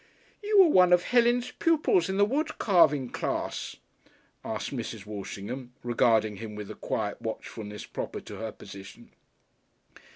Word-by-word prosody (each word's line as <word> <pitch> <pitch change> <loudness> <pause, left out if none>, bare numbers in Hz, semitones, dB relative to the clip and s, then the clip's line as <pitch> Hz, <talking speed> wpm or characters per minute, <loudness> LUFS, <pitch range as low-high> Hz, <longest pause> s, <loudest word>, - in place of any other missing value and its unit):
"You 415 -1 +5
were 345 - +4
one 180 -9 +6
of 175 0 +5
Helen's 245 0 +2
pupils 300 - +2
in 190 - -1
the 205 - +5
wood 300 +8 -1
carving 155 - +3
class?" - - -3 0.7
asked 110 +4 -4
Mrs. 115 -4 -5
Walshingham, 105 +5 -7
regarding 115 -3 +2
him 110 0 -7
with 105 -1 -7
the - - -5
quiet - - -3
watchfulness 105 -1 -6
proper - - -5
to - - -9
her 110 -1 -4
position. 95 -1 -12
130 Hz, 140 wpm, -28 LUFS, -, 0.7 s, one